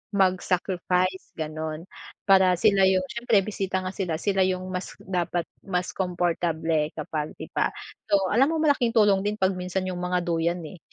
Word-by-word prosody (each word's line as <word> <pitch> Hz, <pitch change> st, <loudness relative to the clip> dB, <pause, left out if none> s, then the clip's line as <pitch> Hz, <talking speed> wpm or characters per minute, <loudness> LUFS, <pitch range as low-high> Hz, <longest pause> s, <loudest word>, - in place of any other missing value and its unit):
mag 185 Hz, -2 st, +3 dB
sacrifice 185 Hz, 0 st, -1 dB
ganun. 155 Hz, 0 st, -4 dB, 0.4 s
Para 190 Hz, -2 st, +5 dB
sila 200 Hz, -1 st, +4 dB
yung 185 Hz, -1 st, +3 dB
siyempre 235 Hz, -4 st, +2 dB
bisita 195 Hz, -3 st, -2 dB
nga 185 Hz, -, -3 dB
sila, 180 Hz, -5 st, -2 dB
sila 195 Hz, +3 st, 0 dB
yung 185 Hz, 0 st, -2 dB
mas 180 Hz, +1 st, -4 dB
dapat 175 Hz, -2 st, -1 dB, 0.2 s
mas 180 Hz, -2 st, -2 dB
comfable 165 Hz, -4 st, 0 dB
kapag 155 Hz, 0 st, -3 dB
iba, -, -, -1 dB, 0.4 s
so 195 Hz, -1 st, +3 dB
alam 255 Hz, -, +3 dB
mo 320 Hz, -, 0 dB
malaking 285 Hz, -6 st, +2 dB
tulong 205 Hz, -4 st, +4 dB
din 210 Hz, +1 st, -2 dB
pag 190 Hz, 0 st, +2 dB
minsan 185 Hz, +1 st, -3 dB
yung 180 Hz, -1 st, -4 dB
mga 180 Hz, 0 st, +1 dB
duyan 170 Hz, +1 st, 0 dB
eh, 185 Hz, -, -12 dB
185 Hz, 165 wpm, -25 LUFS, 175-195 Hz, 0.4 s, Para